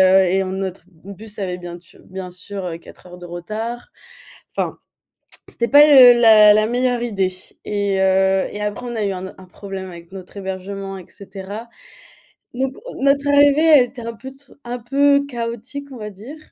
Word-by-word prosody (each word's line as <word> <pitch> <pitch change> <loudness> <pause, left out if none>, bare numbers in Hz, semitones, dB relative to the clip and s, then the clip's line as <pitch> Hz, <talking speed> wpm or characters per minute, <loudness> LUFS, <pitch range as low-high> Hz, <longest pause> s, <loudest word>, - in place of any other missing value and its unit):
heu, 190 0 +6
et 190 +2 +1
en 190 0 -4
notre 190 -2 -5
bus 200 +5 -11
avait 180 -3 -3
bien 175 -1 -8
tu 170 - -22
bien 185 -1 -8
sûr, 190 +2 -8
heu, 165 -2 -4
4 170 - -16
heures 180 0 -12
de 175 - -10
retard. 215 +8 -6 0.7
Enfin - - -2 0.7
c'était 235 - -2
pas 290 +5 +8
le 250 -4 +8
la 215 -2 +7
la 215 +1 +2
meilleure 245 0 0
idée 195 -5 -1 0.3
et 200 -2 -1
heu, 190 0 +2
et 210 - -7
après 210 +4 -4
on 240 - -5
a 220 - -1
eu 200 - -1
un 185 0 -5
o - - -10
un 190 - -14
problème 190 +1 -8
avec 170 -1 -13
notre 190 +1 -11
hébergement, 195 0 -6
et 185 - -11
cetera 200 +3 -9 0.9
donc 260 +1 -2 0.3
notre 280 +1 +2
arrivée 285 +2 +4
a 300 - +8
été 245 0 -3
un 230 0 -6
peu 260 +4 -10
tsou 270 +1 -18
un 245 +1 -5
peu 280 +4 +2
chaotique 245 +2 -6
on - - -9
va 210 -1 -7
dire, 215 +10 -11
205 Hz, 195 wpm, -19 LUFS, 190-245 Hz, 0.9 s, pas